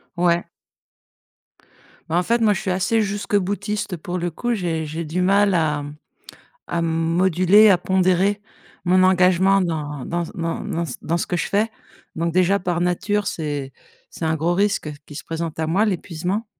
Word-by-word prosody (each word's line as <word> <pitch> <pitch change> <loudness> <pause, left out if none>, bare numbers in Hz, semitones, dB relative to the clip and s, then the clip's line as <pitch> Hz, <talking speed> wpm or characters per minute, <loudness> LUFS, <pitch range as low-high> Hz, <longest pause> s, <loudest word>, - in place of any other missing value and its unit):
Ouais. 170 -1 +1 1.6
Bah, 165 - -1
en 180 - +2
fait, 235 +4 +1
moi, 215 -2 +4
je - - -4
suis 190 - -2
assez 190 +5 +1
jusque-boutiste 205 -1 -2
pour 175 +3 -5
le 175 -1 -2
coup, 240 +8 -2
j'ai 165 -6 -2
j'ai 160 +3 -4
du 165 +4 -2
mal 200 +1 +3
à 150 -3 +1 0.8
à 170 - -2
moduler, 175 +5 +4
à 190 - +6
pondérer 190 +2 +2 0.5
mon 185 +1 +4
engagement 185 +1 +4
dans 150 -5 -3
dans 175 0 -1
s - - -7
dans 165 -2 -3
dans 170 -5 -2
ce 125 - -6
dans 170 +2 -1
ce - - -2
que 175 - -1
je - - -1
fais, 210 +3 +1 0.5
donc 165 0 -1
déjà, 185 +2 +3
par 175 -2 -2
nature, 200 +4 0
c'est 145 -6 -3 0.4
c'est 165 - -7
un 160 0 +1
gros 170 +3 0
risque 200 -5 0 0.2
qui 145 - -11
se - - -7
présente 165 -1 -4
à 160 - 0
moi 195 +6 +2
l'épuisement 185 +2 -2
180 Hz, 175 wpm, -21 LUFS, 165-195 Hz, 1.6 s, à